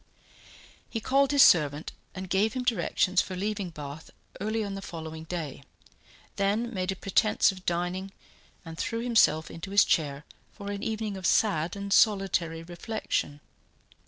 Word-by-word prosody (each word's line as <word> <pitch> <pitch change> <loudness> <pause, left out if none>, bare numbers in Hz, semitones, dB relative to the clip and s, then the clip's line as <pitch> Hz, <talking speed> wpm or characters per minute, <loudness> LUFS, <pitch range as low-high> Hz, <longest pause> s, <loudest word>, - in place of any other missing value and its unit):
He 225 - -3
called 275 +4 +2
his 285 -1 +7
servant, 150 -2 +4 0.2
and 185 0 -5
gave 200 +4 +1
him 255 - -2
directions 200 -6 +2
for 185 - -6
leaving 200 0 -2
Bath 150 -1 -8 0.3
early 215 +2 -1
on 200 -1 -4
the 195 - -5
following 160 -3 -7
day, 160 -5 -5 0.8
then 215 +5 0
made 185 -1 -1
a - - -3
pretence 200 +3 +2
of 185 -1 -13
dining, 180 +3 -1 0.5
and 165 0 -9
threw 230 0 -2
himself 220 -10 +3
into 165 +3 -7
his 200 +1 +5
chair 145 -2 0 0.3
for 200 -1 -6
an 200 0 -4
evening 215 -2 -3
of 185 - -1
sad 170 -5 +2
and 200 0 -2
solitary 190 -7 +2
reflection. 175 -4 -3
190 Hz, 155 wpm, -28 LUFS, 165-215 Hz, 0.8 s, his